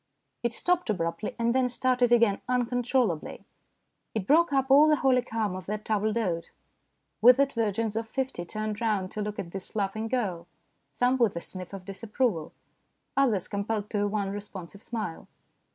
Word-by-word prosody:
It 235 0 -1
stopped 355 -5 +1
abruptly 170 -1 -2
and 235 0 +1
then 255 -1 +2
started 250 -1 +2
again 230 -4 +4
uncontrollably. 245 - 0 0.7
It 210 -4 -1
broke 320 - +4
up 270 -1 +1
all 290 +3 +8
the 305 - +5
holy 260 -3 +3
calm 220 -5 -2
of 185 -1 -8
that 210 +1 -4
table 215 0 +1
d'hote. 185 -7 -1 0.7
Withered 265 +4 +6
virgins 220 -1 -1
of 225 0 -2
fifty 265 -7 -3
turned 215 +4 -4
round 205 -5 0
to 215 - -4
look 210 0 -4
at 170 - -5
this 195 +3 -6
laughing 215 +2 -1
girl, 195 -9 -2 0.4
some 250 +1 +2
with 235 -7 +2
a 170 - -3
sniff 185 0 -7
of 195 -2 -8
disapproval, 205 -3 -2 0.6
others 235 -9 +2
compelled 205 +1 -3
to 205 - 0
a 205 - +2
wan, 200 -1 -1
responsive 200 -2 -8
smile. 215 -9 -5
220 Hz, 170 wpm, -28 LUFS, 195-245 Hz, 0.7 s, all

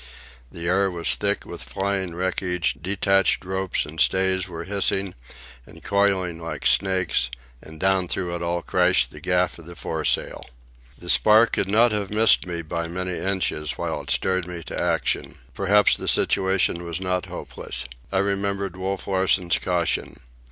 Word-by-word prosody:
The 85 0 -6
air 95 +2 +2
was 85 -2 +1
thick - - -1
with - - -4
flying 95 -3 -3
wreckage, 90 -2 -1
detached 95 +1 +1
ropes 95 0 -1
and 80 +2 -4
stays 95 0 +2
were 85 -2 -7
hissing 100 0 -1 0.5
and 80 - -16
coiling 100 -4 +1
like 80 -3 -6
snakes, 95 -10 +2 0.3
and 80 0 -12
down 95 0 +2
through 90 -1 -2
it 85 - -5
all 85 0 -2
crashed - - +2
the - - -11
gaff 90 -1 0
of 85 - -13
the 85 - -9
foresail. 80 -2 -2 0.5
The 90 - -13
spar 110 +5 +7
could 100 - -2
not 115 +3 +4
have 105 -2 -1
missed 110 -2 +4
me 85 -1 -4
by 85 +1 -4
many 90 +1 -4
inches, 90 -7 -1
while - - -3
it - - -11
spurred 95 -1 0
me 90 -1 -7
to - - -5
action. - - -1 0.2
Perhaps 100 +1 +4
the - - -6
situation 95 -2 +1
was 85 -1 -4
not 90 -1 -2
hopeless. - - -4 0.3
I 95 - 0
remembered 100 -1 -1
Wolf 95 +1 -3
Larsen's 95 -2 +2
caution. 85 -1 -1
95 Hz, 160 wpm, -23 LUFS, 85-95 Hz, 0.5 s, spar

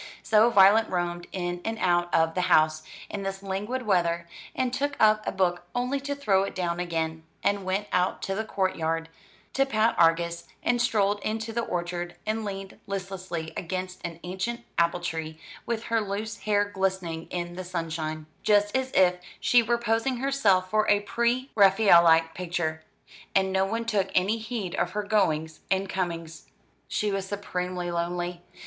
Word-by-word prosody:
So 220 +2 +5
Violet 205 +1 +6
roamed 175 -1 -2
in 175 -1 -3
and 225 0 -2
out 175 -3 +1
of 165 0 +3
the 180 - 0
house, 155 0 +4 0.3
in 200 - -5
this 195 0 -4
languid 205 +7 -3
weather, 170 -5 +1 0.3
and 255 -1 0
took 285 +2 -1
up 215 0 +5
a - - +1
book 175 -2 +1
only 250 +3 0
to 285 +1 -3
throw 205 -9 +2
it 195 - -3
down 175 -2 -1
again, 160 -2 -2 0.2
and 200 -1 +1
went 190 +2 0
out 180 0 +1
to 195 - -1
the 215 +3 -1
court 190 -3 -1
yard 165 0 -2 0.4
to 270 - +3
pat 225 -4 +2
Argus, 170 +1 +3 0.2
and 240 -1 +2
strolled 205 -4 +2
into 220 +2 -3
the 235 - 0
orchard 175 -3 -3
and 220 +1 -1
leaned 195 -2 -6
listlessly 185 -4 -5
against 185 +1 -4
an 170 -1 -5
ancient 190 +7 -3 0.2
apple 170 +1 +2
tree, 160 -2 -4 0.3
with 230 -1 -2
her 230 -1 +1
loose 210 +1 -3
hair 205 -1 +2
glistening 190 -5 -2
in 175 -1 -4
the 185 - -5
sunshine 160 -3 -4 0.2
just 205 +1 +3
as 260 0 0
if 180 -1 +4 0.2
she 245 - +5
were 235 +1 +1
posing 235 +2 0
herself 220 -9 +2
for 215 0 +2
a 205 0 +4
pre 235 +5 0
Raphaelite 170 -6 +6
picture 170 -3 -2 0.5
and 190 -1 +2
no 190 0 +3
one 230 +4 -2
took 205 -4 0
any 200 +5 +2
heed 220 -5 -4
of - - -1
her 210 0 -1
goings 160 -7 0
and 190 +1 +1
comings. 170 -4 -4 0.4
She 210 -1 -1
was 195 -1 -2
supremely 180 -3 -3
lonely. 175 +1 -2
190 Hz, 170 wpm, -27 LUFS, 175-215 Hz, 0.5 s, Violet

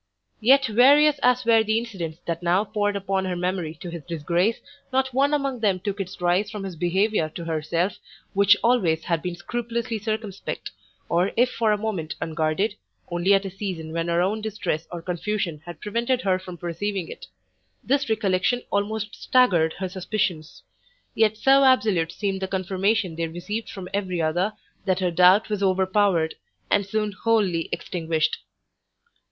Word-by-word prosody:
Yet 265 +5 +5
various 280 +6 +5
as 250 0 +3
were 225 -1 +5
the 220 +1 +1
incidents 190 -9 -4
that 170 0 -3
now 175 +3 +2
poured 205 -1 -1
upon 195 -1 -1
her 185 -1 -2
memory 175 -2 -2
to 175 - -6
his 170 -3 -7
disgrace, 170 +7 0 0.3
not 260 0 +1
one 275 +3 +3
among 275 -4 0
them 200 -4 +1
took 200 +1 -4
its 195 0 -5
rise 180 +4 +1
from 210 -2 -6
his 190 -3 -6
behaviour 180 +1 +1
to 165 +2 -8
herself, 165 +3 -1 0.3
which 200 +1 +5
always 185 -10 +2
had 170 -2 -1
been 180 0 -4
scrupulously 235 +4 -3
circumspect, 215 -2 -4 0.4
or 175 +3 +1
if 245 +2 +4
for 225 -2 +1
a 210 - +2
moment 205 -7 -3
unguarded, 160 +6 0 0.4
only 175 +3 +1
at 195 0 0
a 195 - -4
season 180 -5 -5
when 165 0 -1
her 170 0 +2
own 210 +4 -1
distress 210 -7 -3
or 170 -1 -6
confusion 180 -3 -2
had 170 -3 -8
prevented 235 +4 -1
her 185 -4 +1
from 185 -1 -9
perceiving 175 +2 -3
it. - - -10 0.6
This 280 0 +1
recollection 215 +2 +1
almost 210 +1 -1
staggered 180 -11 +3
her 190 - -4
suspicions; 185 -4 -3 0.5
yet 220 -1 +2
so 270 +3 +5
absolute 210 -10 +3
seemed 195 0 -3
the 190 - -1
confirmation 190 0 0
they 165 0 -2
received 205 +7 -5
from 190 -2 -7
every 185 -3 -1
other, 175 +6 0 0.3
that 185 -2 +1
her 180 -2 0
doubt 180 +4 +5
was 210 -2 -2
overpowered, 190 -3 +2 0.4
and 200 -1 +2
soon 210 +1 -1
wholly 195 -5 +1
extinguished. 160 -3 -1
195 Hz, 165 wpm, -24 LUFS, 175-220 Hz, 0.6 s, Yet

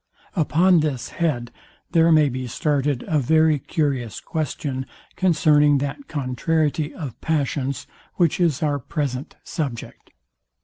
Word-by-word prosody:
Upon 170 +4 +4
this 145 -5 -2
head 125 -8 -1 0.4
there 165 0 +4
may 155 -2 +5
be 130 -1 -4
started 140 0 0
a 155 - +2
very 155 +2 +3
curious 135 - -2
question 140 -4 -3 0.3
concerning 150 -5 +4
that 145 - -4
contrariety 150 +2 -1
of 140 -9 -7
passions, 140 -4 -1 0.3
which 170 -2 +2
is 165 -3 +1
our 145 -2 +1
present 140 +1 -4
subject. 145 -9 -5
150 Hz, 120 wpm, -23 LUFS, 135-160 Hz, 0.4 s, may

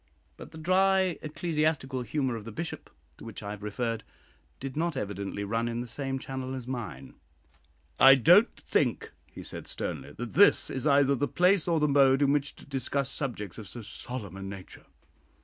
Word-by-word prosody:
'" - - -39
But - - -10
the - - -11
"dry 185 +2 +2
ecclesiastical 155 -4 -1
humour" 130 +1 -1
of 110 - -6
the 115 - -8
Bishop, 165 +10 -6 0.3
to - - -11
which - - -8
I 100 - -5
have 105 -1 -7
referred, 110 +2 -3 0.6
did 135 -1 -6
not 165 -1 -1
evidently 100 -2 -4
run 115 +3 -1
in 120 0 -3
the 120 - -6
same 135 +3 -3
channel 130 0 -5
as 130 -2 -6
mine. 110 - -6 0.9
"I 135 0 +9
don't 175 - +6
think," - - 0 0.2
he - - -9
said, - - -8
sternly, 70 0 -4
"that 120 +5 -6
this 205 - +5
is 135 +3 -2
either 140 -1 +4
the 145 +2 0
place 180 +2 +3
or 165 -2 +2
the 150 - +3
mode 140 -1 +5
in 140 0 +3
which 145 0 -1
to - - -15
discuss 135 0 -2
subjects 115 - -5
of 105 - -9
so 115 +5 -9
solemn 105 -3 -7
a - - -8
nature." 95 -1 -9
130 Hz, 190 wpm, -29 LUFS, 115-150 Hz, 0.9 s, I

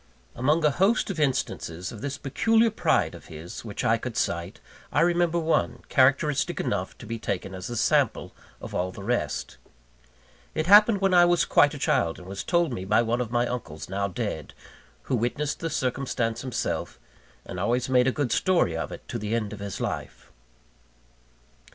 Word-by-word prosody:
Among 150 +6 +1
a 150 - +5
host 195 - +2
of 180 - -5
instances 90 - -1
of 110 - -9
this 140 0 -4
peculiar 225 - +2
pride 220 - +1
of - - -12
his 80 +3 -9
which 105 -3 -5
I 115 +1 +3
could 120 0 -5
cite, 85 +5 -2 0.3
I 145 - +2
remember 170 0 +2
one, 165 -1 0
characteristic 145 +5 +2
enough 95 -2 -2
to - - -11
be 115 +1 -5
taken 95 -3 -3
as 90 +2 -6
a 120 - -4
sample - - +1 0.3
of - - -9
all 90 +1 -1
the 100 - -10
rest. 120 +4 -2 1.0
It 155 - 0
happened 205 +2 +7
when 195 -1 +3
I 175 -1 +7
was 175 0 +3
quite 145 +1 +4
a - - -6
child, 85 -10 +1
and 90 - -12
was 95 +1 -5
told 170 -6 +1
me 95 - -4
by 105 +4 +3
one 120 +2 0
of 120 - -3
my 120 +1 +1
uncles 85 -12 -6
now 100 +1 -1
dead 95 - -5 0.5
who 130 - -1
witnessed 125 +6 -1
the 165 - -2
circumstance 125 -4 -1
himself, 130 -3 -3 0.5
and 90 - -6
always 120 +6 0
made 125 -1 +3
a - - +4
good 140 -4 -2
story 170 - +2
of 80 - -3
it - - -10
to 120 - -3
the 105 +2 -2
end 105 -3 -2
of 105 - -8
his 100 -1 -5
life. - - -5
125 Hz, 190 wpm, -26 LUFS, 100-155 Hz, 1.0 s, happened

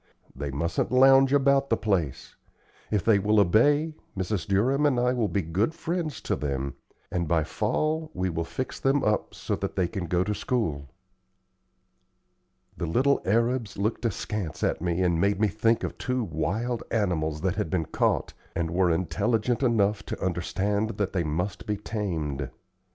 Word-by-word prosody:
They 70 +2 -4
mustn't 75 +5 -1
lounge 135 +1 +6
about 140 0 +3
the 115 - +2
place. 95 -10 -1 0.5
If 105 -3 0
they 110 -3 +5
will 105 +2 +3
obey, 145 - +4 0.2
Mrs. 95 -1 -2
Durham 130 +10 +3
and 130 -4 +2
I 125 +1 +2
will 120 -4 +1
be 100 -2 -1
good 95 - 0
friends 165 -5 -3
to - - -1
them, 70 -2 -3 0.4
and 85 -2 -1
by 80 0 +2
fall 155 - -1
we 95 - 0
will 85 -2 -2
fix 130 +10 -5
them 135 +1 +2
up 105 -1 0
so - - -2
that - - -4
they 90 -3 +1
can 95 -1 -4
go 90 +2 +2
to 105 +2 -1
school." 80 - -2 1.9
The 85 - -3
little 135 - +2
arabs 115 +1 +1
looked 110 +4 -1
askance 105 -4 -3
at - - 0
me 90 +1 0
and 85 -2 +2
made 100 0 +2
me 110 -1 +3
think 115 +2 +1
of - - -4
two 125 -1 -1
wild 110 +8 -2
animals 80 -8 0
that 95 0 +1
had 105 - -1
been 90 -4 0
caught, - - 0 0.2
and 85 -1 -1
were 90 +1 +2
intelligent 105 - 0
enough 105 -5 +2
to - - -4
understand 100 +4 -1
that 100 -2 -1
they 90 -3 +1
must 90 +8 -3
be 105 -1 -1
tamed. 80 - -3
100 Hz, 170 wpm, -27 LUFS, 85-120 Hz, 1.9 s, lounge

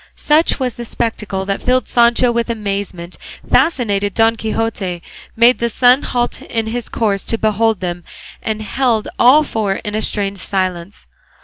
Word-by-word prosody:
Such 305 0 +2
was 255 -3 -2
the 240 - -5
spectacle 210 -4 -3
that 195 0 -2
filled 255 -1 +1
Sancho 240 +1 +3
with 235 0 -1
amazement, 200 -5 -4 0.3
fascinated 205 - +1
Don 225 0 +3
Quixote, 220 -5 -3 0.3
made 235 +2 +4
the 235 - 0
sun 250 +3 +4
halt 245 -1 -2
in 225 -1 -3
his 235 +2 -4
course 205 -4 -1
to 230 - -1
behold 220 -1 +1
them, 175 -1 -4 0.4
and 220 -1 -3
held 235 -1 0
all 270 +6 +6
four 215 -8 -2
in 210 - -6
a 215 - -1
strange 200 -2 -1
silence. 185 0 -3
220 Hz, 155 wpm, -17 LUFS, 200-240 Hz, 0.4 s, all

